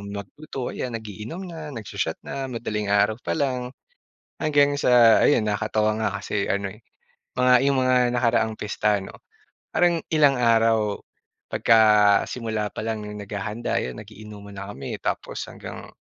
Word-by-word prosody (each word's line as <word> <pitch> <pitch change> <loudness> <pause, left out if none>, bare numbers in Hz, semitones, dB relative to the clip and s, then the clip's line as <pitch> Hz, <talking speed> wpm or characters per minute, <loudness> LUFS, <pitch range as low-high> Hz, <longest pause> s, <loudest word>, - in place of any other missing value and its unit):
mo - - -9 0.2
magluto, 135 +2 -7
ayan 125 - -4
nag-iinom 110 - -7
na, 160 -3 -8
nag-sho-shot 105 -6 -4
na, 135 - -5
madaling 105 -4 -3
araw 105 +1 +3
pa - - -1
lang. 130 -4 -1 0.7
Hanggang 145 -2 +3
sa 120 -2 +6
ayun 115 -7 +3
nakatawa 105 +1 0
nga - - +1
kasi 100 -1 -2
ano, 100 -1 -1
eh, 110 - -18 0.5
mga 125 0 +4
'yong 140 0 +2
mga 130 0 +3 0.2
nakaraang 115 -2 +1
pista 105 0 0
ano, - - -11 0.5
parang 175 -1 +2
ilang 145 -3 +4
araw, 115 -3 +3 0.6
pagka 115 - +4 0.5
simula 110 -3 -3
pa - - -6
lang 110 -2 -3
no'ng 105 0 -7
naghahanda, 105 +3 -3
'yon 65 -1 -6
nag-iinuman 105 -1 -11
na 100 +1 -6
kami 70 -6 -6
tapos - - -3
hanggang - - -9
110 Hz, 150 wpm, -24 LUFS, 105-125 Hz, 0.7 s, sa